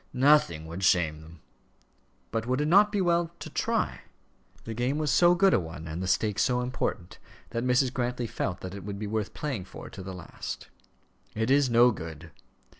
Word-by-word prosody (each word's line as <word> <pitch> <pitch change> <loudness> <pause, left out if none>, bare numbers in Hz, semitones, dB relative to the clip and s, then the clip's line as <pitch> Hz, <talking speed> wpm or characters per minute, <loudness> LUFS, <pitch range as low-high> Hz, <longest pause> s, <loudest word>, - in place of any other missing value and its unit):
"Nothing 125 - +4
would 85 +4 -6
shame 80 -4 +2
them." 80 0 -14 0.9
"But 115 +1 -2
would 130 +2 +1
it 150 - +1
not 205 +5 +6
be 205 -2 0
well 170 -1 +2
to - - -8
try?" - - -1 0.6
The 115 - -5
game 125 +5 -1
was 155 -2 0
so 175 0 +5
good 190 +2 +4
a - - +4
one, 80 -2 -7
and 80 +3 -5
the 95 - -2
stake 105 +2 +1
so 125 -1 +2
important, 125 -7 -3 0.3
that 115 - -2
Mrs. 125 +1 +2
Grantly 125 -1 -2
felt 105 -5 -3
that 95 0 -6
it 100 - -8
would 100 0 -5
be 105 - -4
worth 105 0 -3
playing 130 -11 -3
for - - -10
to 95 - -9
the 95 0 -7
last. 90 -3 -7 0.7
"It 110 +3 0
is 140 -1 +4
no 120 +1 +6
good." 80 -4 -8
115 Hz, 195 wpm, -28 LUFS, 90-135 Hz, 0.9 s, not